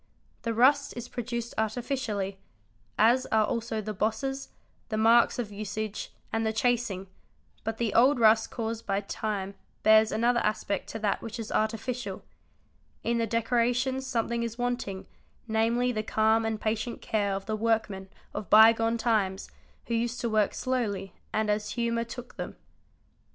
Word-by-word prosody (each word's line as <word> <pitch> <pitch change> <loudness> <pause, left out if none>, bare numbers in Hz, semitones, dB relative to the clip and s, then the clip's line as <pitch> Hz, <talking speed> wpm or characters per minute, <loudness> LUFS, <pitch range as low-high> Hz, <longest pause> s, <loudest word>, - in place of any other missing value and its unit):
The 230 -1 -2
rust 275 +4 +4
is 240 - -5
produced 235 -1 -4
artificially, 220 -4 -2 0.6
as 240 +4 +4
are 220 -1 +3
also 225 0 -2
the 215 +1 -4
bosses, 270 +7 -2 0.4
the 215 - -1
marks 230 +2 +5
of 230 -4 -3
usage, 210 +1 -4 0.2
and 225 0 +1
the 220 - +1
chasing, 220 -4 0 0.6
but 225 0 -3
the 225 -3 -1
old 255 +3 +5
rust 220 0 +5
caused 225 -1 -4
by 200 0 +1
time 200 -1 -3 0.3
bears 220 0 +6
another 240 +2 +2
aspect 210 -2 -1
to - - -4
that 205 -2 0
which 230 +1 -6
is 225 - -5
artificial; 220 -1 -2 0.8
in 235 0 +1
the 230 - +1
decorations 245 +3 +1
something 235 -1 -1
is 230 0 -3
wanting, 245 -6 -2 0.4
namely 230 +3 +2
the 215 -3 -1
calm 220 +1 +2
and 220 -1 -1
patient 220 +2 -2
care 205 -2 0
of 195 0 -5
the 215 - -1
workmen 215 -3 -1 0.2
of 205 - -5
bygone 225 +1 +6
times 210 -5 0 0.3
who 235 - -3
used 235 +1 -1
to 235 - 0
work 215 -2 +2
slowly 215 -7 -2 0.2
and 215 0 0
as 210 0 -1
humour 235 -1 0
took 240 +1 -9
them. - - -5
225 Hz, 155 wpm, -28 LUFS, 215-235 Hz, 0.8 s, bears